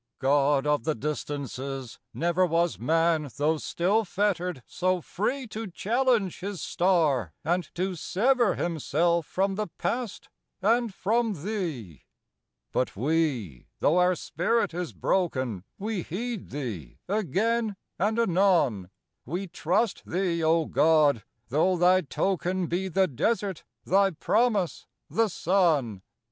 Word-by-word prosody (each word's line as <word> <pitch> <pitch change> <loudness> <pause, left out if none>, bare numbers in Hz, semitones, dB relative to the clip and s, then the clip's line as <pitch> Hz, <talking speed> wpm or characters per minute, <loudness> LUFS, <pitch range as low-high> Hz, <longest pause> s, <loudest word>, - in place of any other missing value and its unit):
God 140 +1 +2
of 150 0 +1
the 155 0 0
Distances, 135 -2 -4
never 175 +2 +1
Was 170 -1 +1
man, 160 +3 +2
though 155 +2 +2
still 195 +8 +1
fettered, 180 - -1
so 185 0 0
free 250 - -2
To 220 +1 -5
challenge 225 +1 +1
his 195 -1 -5
star 155 - +1
and 175 +2 0
to 185 +2 -1
sever 230 - +2
Himself 170 0 0
from 195 +1 0
the 210 +2 -2
past 240 -3 -3 0.3
and 230 +3 +2
from 210 -3 0
thee. 160 - -4 0.7
But 130 - -1
we, 125 - -1
though 170 +5 +3
our 180 0 +4
spirit 175 +6 0
is 175 0 -3
broken, 130 - -1
We 210 -1 -2
heed 220 +6 -5
thee 110 - -6
again 215 +3 0 0.2
and 210 +5 +1
anon; 175 - +2 0.3
We 175 +9 -3
trust 185 +5 0
thee, 175 -2 0
O 160 0 +3
God, 150 -7 +3 0.3
though 170 +7 +2
thy 180 +2 +5
token 185 +2 -1
Be 180 +3 -1
the 190 +1 +2
desert, 195 - -1 0.2
thy 195 +1 +4
promise, 205 +1 0 0.2
the 225 0 +3
sun. 160 - +1
175 Hz, 125 wpm, -27 LUFS, 150-200 Hz, 0.7 s, thy